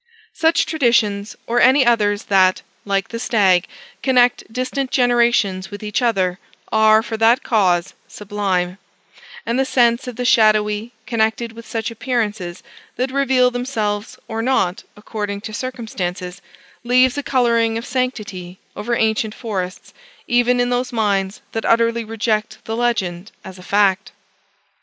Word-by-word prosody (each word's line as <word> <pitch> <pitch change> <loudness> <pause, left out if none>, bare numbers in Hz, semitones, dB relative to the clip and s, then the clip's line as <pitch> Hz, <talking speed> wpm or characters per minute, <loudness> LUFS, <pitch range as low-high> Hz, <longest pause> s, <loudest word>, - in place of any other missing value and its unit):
Such 325 0 +2
traditions, 225 -9 +1
or 240 +1 +1
any 260 +1 +5
others 210 -3 +2
that 190 -5 +3 0.2
(like 195 -1 -1
the 230 - -5
stag) 195 -7 +2 0.3
connect 245 -3 +2
distant 255 +2 -2
generations 235 -7 +2
with 205 0 -9
each 210 +2 -1
other, 190 -6 0 0.3
are, 220 0 +5
for 225 -1 -5
that 225 +3 +3
cause, 185 -6 +1
sublime; 195 -3 -2 0.7
and 235 +3 -1
the - - +4
sense 240 -1 +2
of 250 - -6
the 250 +2 -3
shadowy, 215 -1 +3
connected 225 0 0
with 230 0 -12
such 225 0 -3
appearances 215 -7 -3 0.3
that 255 +2 -2
reveal 260 -2 +2
themselves 220 -4 -3
or 225 0 -3
not 215 -7 0
according 205 -1 -5
to 215 +1 -7
circumstances, 195 -7 -5 0.4
leaves 250 +1 +3
a 290 - -2
coloring 235 -4 +1
of 230 - -5
sanctity 215 -8 -4 0.2
over 235 +2 -2
ancient 220 -1 0
forests, 190 -6 -5 0.3
even 245 +1 +2
in 245 0 +1
those 245 +1 -1
minds 200 -4 -1
that 225 - -3
utterly 230 0 +2
reject 220 -1 -2
the 225 - -3
legend 205 -6 -1
as 190 -1 -10
a - - -11
fact. 200 0 +1
225 Hz, 140 wpm, -19 LUFS, 205-245 Hz, 0.7 s, any